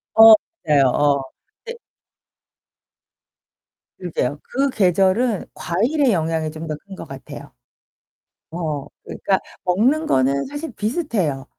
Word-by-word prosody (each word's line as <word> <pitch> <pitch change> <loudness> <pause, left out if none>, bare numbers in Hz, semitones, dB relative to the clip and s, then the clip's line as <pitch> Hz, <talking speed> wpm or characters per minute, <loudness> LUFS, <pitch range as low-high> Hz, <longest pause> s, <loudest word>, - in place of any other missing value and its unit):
어 225 0 +10 0.3
맞아요. 145 -3 +4
어. 145 +1 +2 0.4
근데 470 +1 -7 2.2
그러게요. 150 -6 -3
그 275 +2 0
계절은 195 +3 +2
과일의 240 - 0
영향이 160 -2 -1
좀 160 +1 -8
더 155 - -3
큰 195 - -9
거 165 - -9
같아요. 135 -2 -10 1.0
어, 155 -5 -3 0.2
그러니까 190 -1 -1 0.2
먹는 240 - +2
거는 135 - +1
사실 290 +2 -6
비슷해요. 210 - -2
180 Hz, 225 characters per minute, -21 LUFS, 150-235 Hz, 2.2 s, 어